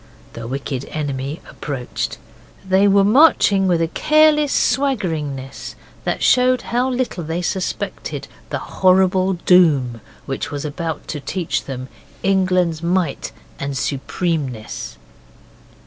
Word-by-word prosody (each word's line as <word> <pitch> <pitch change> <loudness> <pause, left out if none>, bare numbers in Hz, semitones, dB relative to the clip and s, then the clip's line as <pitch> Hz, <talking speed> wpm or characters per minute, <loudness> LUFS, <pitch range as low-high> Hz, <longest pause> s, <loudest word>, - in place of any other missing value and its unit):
The 115 -1 -7
wicked 135 0 -4
enemy 145 0 -4
approached. 135 -4 -4 0.5
They 190 +2 +4
were 200 0 +5
marching 210 -5 +5
with 170 -2 +2
a - - +1
careless 305 - +3
swaggeringness 165 - -1 0.3
that - - -1
showed 255 0 +4
how 245 +2 0
little 250 -8 -2
they 165 +3 -3
suspected 185 +1 -3 0.2
the - - -2
horrible 185 0 +2
doom 155 -10 +3 0.2
which 135 +1 -3
was 145 -1 -5
about 155 +1 -4
to 150 - -3
teach 170 +4 -2
them 130 -1 -6 0.4
England's 185 -4 +2
might 170 -7 -1 0.3
and 140 -1 -3
supremeness. 140 -4 -3
175 Hz, 115 wpm, -20 LUFS, 140-195 Hz, 0.5 s, were